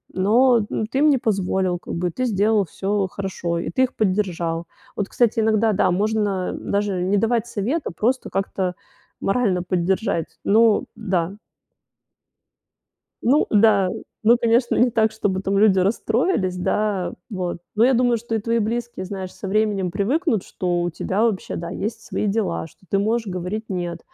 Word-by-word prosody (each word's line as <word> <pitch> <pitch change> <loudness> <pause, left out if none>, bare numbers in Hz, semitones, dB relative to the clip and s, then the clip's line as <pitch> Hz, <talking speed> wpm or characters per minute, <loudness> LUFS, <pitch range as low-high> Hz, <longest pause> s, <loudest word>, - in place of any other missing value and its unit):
но, 230 +4 +4
м, 220 - -1
ты 265 +4 -2
им 305 - +5
не 280 - +4
позволил, 190 -4 0
как - - -8
бы, 175 0 -1
ты 255 - -2
сделал 210 -2 +2
всё 195 +4 -1
хорошо, 185 -3 -3
и - - -3
ты 255 +9 +2
их 255 - -1
поддержал. 180 -5 -1 0.3
Вот, 200 - -2
кстати, 235 -2 +2
иногда, 220 0 +2
да, 185 - +2
можно 205 -1 0
даже 200 -2 -1
не 195 +3 +2
давать 225 +2 +1
совет, 240 +8 -1
а - - -3
просто 245 +9 -1
как-то 190 -2 -2 0.5
морально 195 -4 +1
поддержать. 180 -1 0 0.2
Ну 220 +1 +4
да. 185 -3 -1 1.9
Ну 275 +6 +4
да, 205 -3 +4 0.3
ну 235 +2 +6
конечно, 235 +1 +2
не 245 - +4
так, 220 -1 +2
чтобы 190 -3 -1
там 195 0 0
люди 200 -2 +5
расстроились, 210 - +1
да, 190 -1 -1 0.2
вот, 180 -5 -3
но 220 +2 +4
я 265 - +4
думаю, 245 -1 +3
что 230 0 -4
и - - +1
твои 230 +2 0
близкие, 230 -2 -3
знаешь, 190 -1 -6
со 195 - -7
временем 200 -2 0
привыкнут, 235 - 0
что 175 -1 -2
у 175 - 0
тебя 190 +5 -1
вообще, 220 -5 -1
да, 170 0 -5
есть 220 +5 -4
свои 210 - -3
дела, 205 -5 -1
что - - -24
ты 195 - +2
можешь 225 +2 0
говорить 185 +4 -4
нет. 175 -3 -3
205 Hz, 170 wpm, -22 LUFS, 185-225 Hz, 1.9 s, ну